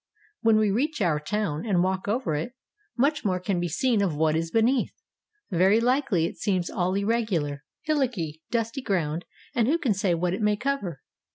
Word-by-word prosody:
When 225 -2 +4
we 215 -2 +3
reach 280 +9 0
our 170 -7 +2
town 160 -2 -2
and 190 -6 +2
walk 190 +1 -1
over 225 -5 0
it, 155 +12 -3 0.4
much 285 +4 +2
more 185 -4 +1
can 185 0 -1
be 175 - -1
seen 220 - +1
of 180 -6 0
what 155 0 +2
is 165 +1 -1
beneath. 235 +6 +2 0.6
Very 190 +5 +4
likely 240 - +2
it - - -5
seems 185 -4 0
all 185 +1 0
irregular, 200 -9 0 0.2
hillocky, 235 - -1
dusty 230 +3 -1
ground, 170 -7 -1 0.3
and 235 -2 +2
who 310 +5 +3
can 265 -10 +1
say 190 -2 +1
what 175 +1 0
it 195 - -3
may 210 0 +3
cover? 205 - -3
200 Hz, 185 wpm, -26 LUFS, 170-235 Hz, 0.6 s, When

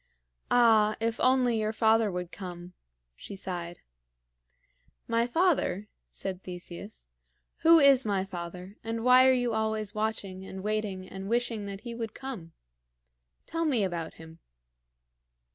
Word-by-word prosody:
"Ah, 220 -3 +5
if 230 +1 -1
only 255 -3 +3
your 215 0 0
father 220 -1 +3
would 180 -1 -4
come!" 175 0 -8 0.4
she 200 - -9
sighed. 175 -2 -6 1.3
"My 230 +1 +1
father?" 255 - +1 0.2
said 190 -1 -4
Theseus. 180 +3 -9 0.5
"Who 330 +1 +7
is 280 -3 +6
my 200 -3 0
father, 180 +1 -8
and 225 0 -3
why 255 +1 +7
are - - +7
you 245 -2 +1
always 220 -1 -1
watching 210 -3 -3
and 190 0 -8
waiting 210 -3 -2
and 195 +1 -7
wishing 230 -3 -1
that 200 0 -7
he 235 -2 -6
would 230 -2 -5
come? 240 -12 -7 0.9
Tell 330 0 -2
me 265 -9 +2
about 170 -4 -3
him." 160 0 -13
215 Hz, 135 wpm, -29 LUFS, 185-235 Hz, 1.3 s, Who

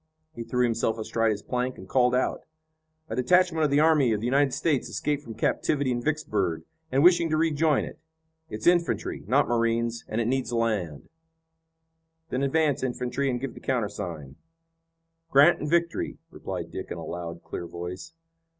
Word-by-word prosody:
He 120 - -6
threw 125 +2 0
himself 115 -1 0
astride 115 +1 0
his 105 -1 -2
plank, 125 0 -2
and 95 - -11
called 125 +1 +3
out: 130 - 0 0.7
"A 110 - -4
detachment 165 +5 +3
of - - +1
the 140 +1 +3
army 150 -6 +4
of 105 - -1
the 110 - -4
United 135 +2 +3
States 145 0 0
escaped 145 -1 -1
from 115 -5 -9
captivity 135 +4 0
in 120 -1 -1
Vicksburg, 105 - -1 0.3
and 135 +2 +3
wishing 170 -1 +5
to 155 - +1
rejoin 155 -2 +2
it. - - -10 0.5
It's 110 - -6
infantry, 175 -1 +1
not - - +3
marines, 115 0 0
and 110 - -2
it 115 - +1
needs 130 0 -1
land." 105 -10 -1 1.2
"Then 130 - -1
advance 145 0 +1
infantry 125 +2 -1
and 125 -1 -1
give 130 -1 -5
the - - -11
countersign." 100 - -3 0.9
"Grant 140 0 +6
and 150 - -3
Victory," 170 +1 0
replied - - -6
Dick - - -6
in - - -5
a - - -7
loud, 85 -1 -6
clear 85 - -6
voice. 90 - -7
125 Hz, 170 wpm, -26 LUFS, 110-145 Hz, 1.2 s, Grant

